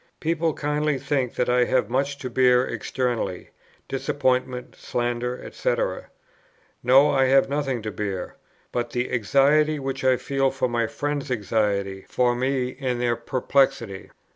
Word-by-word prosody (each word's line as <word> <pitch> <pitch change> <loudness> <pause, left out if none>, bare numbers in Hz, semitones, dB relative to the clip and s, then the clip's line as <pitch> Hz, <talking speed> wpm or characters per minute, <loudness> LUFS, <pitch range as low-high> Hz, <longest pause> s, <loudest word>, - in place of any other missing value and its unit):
People 165 -1 0
kindly 150 0 0
think 135 -2 -1
that 125 - 0
I 125 0 +3
have 130 0 +1
much 140 +3 -1
to 130 - -3
bear 125 0 +4
externally, 120 -8 -3 0.4
disappointment, 130 -2 -1
slander, 120 +1 -3
&c. - - 0 1.1
No, 135 +4 +5
I 135 -1 +3
have 135 +1 +4
nothing 135 -5 -1
to 110 - -3
bear, 95 -1 -4 0.4
but 120 -1 -2
the 125 +1 -2
anxiety 140 +6 +3
which 135 -1 -4
I 130 -1 +4
feel 135 +1 0
for 135 -1 -1
my 120 -1 0
friends' 145 +2 -3
anxiety 100 -4 -1
for 125 -1 +2
me, 130 0 -1
and 125 -2 -1
their 120 -1 +1
perplexity. 120 -4 0
130 Hz, 140 wpm, -24 LUFS, 120-135 Hz, 1.1 s, No